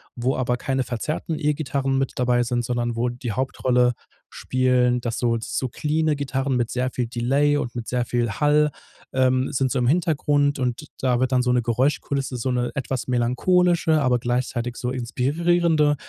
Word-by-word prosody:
wo 125 Hz, +2 st, 0 dB
aber 125 Hz, -1 st, 0 dB
keine 130 Hz, +1 st, -1 dB
verzerrten 150 Hz, +6 st, -3 dB
E-Gitarren 140 Hz, -3 st, 0 dB
mit 135 Hz, 0 st, 0 dB
dabei 125 Hz, -1 st, +2 dB
sind, 120 Hz, 0 st, -1 dB
sondern 120 Hz, -1 st, -1 dB
wo 120 Hz, +2 st, 0 dB
die 120 Hz, -1 st, -5 dB
Hauptrolle 125 Hz, 0 st, +1 dB, 0.4 s
spielen, 125 Hz, -1 st, +1 dB
dass 115 Hz, -1 st, -3 dB
so 115 Hz, -1 st, +1 dB
so 130 Hz, +3 st, -3 dB
cleane 155 Hz, +4 st, 0 dB
Gitarren 135 Hz, -1 st, -1 dB
mit 120 Hz, -2 st, 0 dB
sehr 130 Hz, +1 st, -1 dB
viel 125 Hz, -2 st, -2 dB
Delay 135 Hz, +5 st, +1 dB
und 125 Hz, -4 st, -3 dB
mit 120 Hz, -1 st, -5 dB
sehr 125 Hz, -1 st, -1 dB
viel 120 Hz, -1 st, 0 dB
Hall, 150 Hz, +5 st, +2 dB, 0.4 s
ähm, 130 Hz, 0 st, +2 dB
sind 130 Hz, -1 st, +1 dB
so 135 Hz, -, 0 dB
im 120 Hz, -, +1 dB
Hintergrund 145 Hz, -3 st, +1 dB
und 125 Hz, +4 st, -2 dB
da 125 Hz, -3 st, +1 dB
wird 130 Hz, 0 st, +1 dB
dann 130 Hz, -1 st, +3 dB
so 125 Hz, -, +1 dB
'ne 125 Hz, -1 st, +3 dB
Geräuschkulisse, 135 Hz, +2 st, -1 dB
so 130 Hz, +2 st, -2 dB
'ne 125 Hz, -1 st, -1 dB
etwas 130 Hz, -2 st, -3 dB
melancholische, 160 Hz, +7 st, +2 dB
aber 125 Hz, -2 st, +2 dB
gleichzeitig 120 Hz, 0 st, -2 dB
so 125 Hz, -, -3 dB
inspirierende, 150 Hz, +5 st, +1 dB
130 Hz, 175 wpm, -23 LUFS, 120-145 Hz, 0.4 s, dann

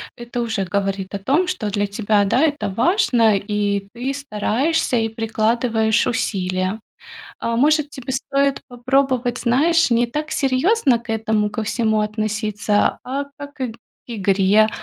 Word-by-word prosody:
это 240 Hz, 0 st, -5 dB
уже 225 Hz, -4 st, -1 dB
говорит 195 Hz, 0 st, -2 dB
о 200 Hz, -, -3 dB
том, 285 Hz, -, +1 dB
что 250 Hz, -, -2 dB
для 205 Hz, 0 st, -1 dB
тебя, 205 Hz, 0 st, +1 dB
да, 240 Hz, +7 st, +2 dB
это 290 Hz, -9 st, 0 dB
важно 230 Hz, -, +3 dB
и 200 Hz, -1 st, -2 dB
ты 255 Hz, +3 st, -3 dB
стараешься 270 Hz, +3 st, -1 dB
и 225 Hz, 0 st, 0 dB
прикладываешь 225 Hz, 0 st, +1 dB
усилия. 185 Hz, -3 st, -1 dB, 0.6 s
А, 230 Hz, 0 st, -1 dB
может, 300 Hz, +3 st, +3 dB
тебе 265 Hz, -1 st, -6 dB
стоит 275 Hz, +1 st, 0 dB
попробовать, 250 Hz, 0 st, 0 dB
знаешь, 305 Hz, +5 st, +2 dB
не 235 Hz, +1 st, +3 dB
так 300 Hz, +5 st, -4 dB
серьезно 275 Hz, -, +2 dB
к 235 Hz, 0 st, -17 dB
этому 220 Hz, -1 st, 0 dB
ко 215 Hz, +1 st, -3 dB
всему 220 Hz, 0 st, 0 dB
относиться, 215 Hz, 0 st, 0 dB
а 275 Hz, +3 st, -3 dB
как 285 Hz, 0 st, -9 dB
к 255 Hz, -4 st, -3 dB, 0.4 s
игре? 205 Hz, 0 st, +3 dB
230 Hz, 140 wpm, -20 LUFS, 210-265 Hz, 0.6 s, важно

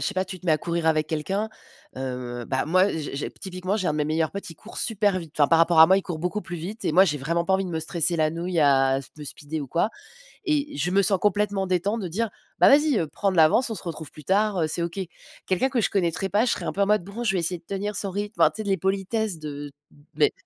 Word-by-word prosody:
sais 205 Hz, -, -1 dB
pas 185 Hz, 0 st, -1 dB
tu 185 Hz, 0 st, -7 dB
te 180 Hz, -, -20 dB
mets 165 Hz, -, +3 dB
à 155 Hz, -, +2 dB
courir 170 Hz, 0 st, -2 dB
avec 155 Hz, -1 st, +2 dB
quelqu'un. 190 Hz, +8 st, -2 dB, 0.5 s
Heu, 125 Hz, -2 st, -5 dB
bah 130 Hz, +2 st, -1 dB
moi, 185 Hz, +5 st, +3 dB
j'ai 150 Hz, -3 st, -4 dB
j'ai 140 Hz, -, -3 dB
typiquement, 185 Hz, +1 st, -4 dB
j'ai 185 Hz, -, 0 dB
un 155 Hz, -, +1 dB
de -, -, -3 dB
mes 150 Hz, -, +1 dB
meilleurs 160 Hz, +1 st, 0 dB
potes, 200 Hz, -3 st, -6 dB
il 165 Hz, -, -9 dB
court 225 Hz, -, -13 dB
super 205 Hz, -4 st, +1 dB
vite. 165 Hz, -4 st, -9 dB
Enfin, 145 Hz, -, +5 dB
par 165 Hz, -, +5 dB
rapport 165 Hz, -1 st, +5 dB
à 160 Hz, -, +11 dB
moi, 190 Hz, +2 st, +5 dB
il 195 Hz, -, 0 dB
court 170 Hz, -4 st, -5 dB
beaucoup 180 Hz, +5 st, -2 dB
plus 175 Hz, -, -6 dB
vite 195 Hz, +7 st, -6 dB
et -, -, +1 dB
moi, 190 Hz, +3 st, +6 dB
j'ai 150 Hz, -, 0 dB
vraiment 170 Hz, +5 st, -1 dB
pas 190 Hz, -, +3 dB
envie 195 Hz, -, +1 dB
de 180 Hz, -, -5 dB
me 160 Hz, -1 st, -2 dB
stresser 170 Hz, +1 st, +1 dB
la 155 Hz, -1 st, +2 dB
nouille, 170 Hz, +1 st, -2 dB
à 135 Hz, -2 st, +4 dB, 0.2 s
me 150 Hz, -, -8 dB
speeder 150 Hz, +2 st, -6 dB
ou -, -, -6 dB
quoi 170 Hz, +9 st, +1 dB, 0.6 s
et 295 Hz, -2 st, 0 dB
je 155 Hz, +5 st, 0 dB
me 195 Hz, +2 st, +3 dB
sens 195 Hz, 0 st, +2 dB
complètement 205 Hz, -1 st, +1 dB
détente 190 Hz, +5 st, 0 dB
de 185 Hz, -, -4 dB
dire: 215 Hz, +5 st, -2 dB, 0.3 s
«Bah -, -, +7 dB
vas-y, 295 Hz, -2 st, +5 dB
heu, 160 Hz, -, 0 dB
prends 195 Hz, +6 st, -1 dB
de 185 Hz, -, -3 dB
l'avance, 165 Hz, +11 st, +5 dB
on 225 Hz, -, -3 dB
se -, -, -7 dB
retrouve 160 Hz, -4 st, -6 dB
plus 150 Hz, -2 st, -13 dB
tard. 205 Hz, +1 st, +2 dB
Heu, -, -, +2 dB
c'est 170 Hz, -, -2 dB
OK.» 170 Hz, +3 st, -4 dB, 0.5 s
Quelqu'un 190 Hz, +8 st, +1 dB
que 250 Hz, -4 st, 0 dB
je -, -, +1 dB
connaîtrais 190 Hz, 0 st, 0 dB
pas, 215 Hz, +5 st, +2 dB
je -, -, +2 dB
serais -, -, -3 dB
un -, -, -2 dB
peu 200 Hz, -, -4 dB
en 200 Hz, -, +4 dB
mode: 210 Hz, -4 st, +2 dB
«bon, 215 Hz, +5 st, -6 dB
je 195 Hz, -4 st, +1 dB
vais 180 Hz, -, +1 dB
essayer 170 Hz, +1 st, -1 dB
de 165 Hz, -, -28 dB
tenir 200 Hz, +1 st, -3 dB
son 195 Hz, 0 st, -1 dB
rythme» 205 Hz, +3 st, -5 dB
enfin -, -, +6 dB
tu 220 Hz, -, -6 dB
sais 200 Hz, -, -6 dB
les 195 Hz, -, +2 dB
politesses 195 Hz, +1 st, -1 dB
de 145 Hz, -1 st, -7 dB, 0.4 s
beh 150 Hz, -1 st, +3 dB
180 Hz, 290 wpm, -25 LUFS, 160-200 Hz, 0.6 s, à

